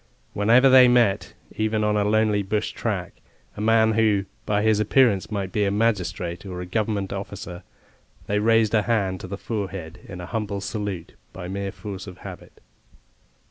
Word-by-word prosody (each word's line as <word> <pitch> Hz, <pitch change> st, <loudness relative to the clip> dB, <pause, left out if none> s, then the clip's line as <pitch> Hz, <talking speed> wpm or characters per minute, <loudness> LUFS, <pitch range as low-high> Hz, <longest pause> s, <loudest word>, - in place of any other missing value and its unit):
Whenever 115 Hz, +6 st, +5 dB
they 130 Hz, -1 st, +8 dB
met, 120 Hz, -5 st, +2 dB, 0.2 s
even 110 Hz, 0 st, 0 dB
on 105 Hz, 0 st, +1 dB
a 105 Hz, -, +2 dB
lonely 105 Hz, 0 st, +2 dB
bush 105 Hz, +2 st, -2 dB
track, -, -, -4 dB, 0.3 s
a -, -, -6 dB
man 110 Hz, 0 st, +4 dB
who, 105 Hz, -3 st, +2 dB, 0.2 s
by 105 Hz, 0 st, +1 dB
his 110 Hz, -1 st, +3 dB
appearance 105 Hz, -2 st, +3 dB
might 100 Hz, -3 st, -3 dB
be 105 Hz, -, +1 dB
a 100 Hz, -, +2 dB
magistrate 90 Hz, -5 st, -1 dB
or 90 Hz, -3 st, -6 dB
a 90 Hz, -, -5 dB
Government 100 Hz, 0 st, -2 dB
officer, 100 Hz, -2 st, -7 dB, 0.6 s
they 105 Hz, +1 st, 0 dB
raised 115 Hz, 0 st, +3 dB
a 110 Hz, -, +4 dB
hand 100 Hz, -5 st, 0 dB
to 95 Hz, -, -8 dB
the 100 Hz, +1 st, -5 dB
forehead 95 Hz, -6 st, -5 dB
in 90 Hz, -, -8 dB
a 90 Hz, -, -6 dB
humble 105 Hz, 0 st, -3 dB
salute 100 Hz, -3 st, -5 dB, 0.2 s
by 90 Hz, -1 st, -7 dB
mere 100 Hz, +1 st, -4 dB
force 100 Hz, -2 st, -8 dB
of 90 Hz, -1 st, -9 dB
habit. -, -, -11 dB
105 Hz, 175 wpm, -24 LUFS, 95-110 Hz, 0.6 s, they